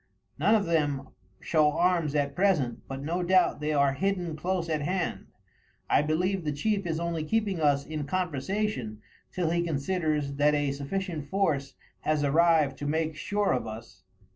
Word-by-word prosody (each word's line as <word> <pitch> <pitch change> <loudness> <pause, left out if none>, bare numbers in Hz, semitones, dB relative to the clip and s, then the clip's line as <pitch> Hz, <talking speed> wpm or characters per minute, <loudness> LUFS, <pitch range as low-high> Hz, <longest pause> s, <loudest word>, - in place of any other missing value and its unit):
None 215 - +4
of 210 - +2
them 145 -5 0 0.3
show 150 -2 +3
arms 170 -4 +1
at 140 -1 +1
present, 155 -10 +1
but 135 0 -6
no 170 +4 -1
doubt 180 -2 +3
they 150 +1 -1
are 140 -2 +3
hidden 180 0 -1
close 175 +2 -2
at 155 -2 -1
hand. 180 +4 -2 0.6
I - - +5
believe 180 +5 0
the 150 - -1
chief 195 +6 -1
is 160 -1 -1
only 170 -2 -2
keeping 205 +1 0
us 140 -2 +2
in 155 -2 -4
conversation 160 - -2 0.3
till 170 -3 -1
he 170 0 +1
considers 155 -2 -1
that 150 +1 +4
a 145 -1 +1
sufficient 150 +1 -4
force 145 -9 0 0.2
has 155 -1 0
arrived 155 -1 +3
to 145 - -3
make 160 +1 -1
sure 205 +4 0
of 125 - -2
us." 110 +1 -9
155 Hz, 165 wpm, -28 LUFS, 145-180 Hz, 0.6 s, I